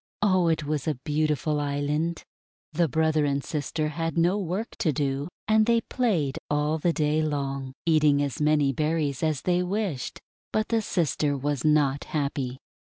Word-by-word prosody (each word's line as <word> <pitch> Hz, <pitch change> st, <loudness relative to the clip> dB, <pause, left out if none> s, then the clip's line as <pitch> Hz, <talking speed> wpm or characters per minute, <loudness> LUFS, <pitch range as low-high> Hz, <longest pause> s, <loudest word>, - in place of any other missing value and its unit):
Oh, 185 Hz, -4 st, +3 dB
it 160 Hz, -2 st, +1 dB
was 150 Hz, -2 st, -2 dB
a 155 Hz, -, +1 dB
beautiful 150 Hz, 0 st, 0 dB
island! 145 Hz, +3 st, -1 dB, 0.5 s
The 170 Hz, -1 st, +2 dB
brother 160 Hz, +1 st, +2 dB
and 140 Hz, -1 st, 0 dB
sister 155 Hz, 0 st, -2 dB
had 165 Hz, +2 st, -3 dB
no 175 Hz, +3 st, +3 dB
work 195 Hz, +4 st, -2 dB
to 160 Hz, -, +2 dB
do, 140 Hz, 0 st, -1 dB, 0.2 s
and 215 Hz, 0 st, +4 dB
they 235 Hz, -1 st, +4 dB
played 185 Hz, -, 0 dB
all 150 Hz, +2 st, +1 dB
the 170 Hz, +3 st, +2 dB
day 155 Hz, -1 st, +1 dB
long, 140 Hz, -3 st, -2 dB
eating 155 Hz, -3 st, +4 dB
as 140 Hz, -1 st, -3 dB
many 150 Hz, -2 st, +3 dB
berries 150 Hz, -2 st, -1 dB
as 155 Hz, -3 st, 0 dB
they 180 Hz, 0 st, +2 dB
wished. 180 Hz, -, -2 dB, 0.3 s
But 215 Hz, 0 st, 0 dB
the 230 Hz, -1 st, +2 dB
sister 150 Hz, -7 st, 0 dB
was 145 Hz, -1 st, -2 dB
not 145 Hz, -2 st, +2 dB
happy. 140 Hz, -4 st, -2 dB
155 Hz, 165 wpm, -26 LUFS, 145-170 Hz, 0.5 s, and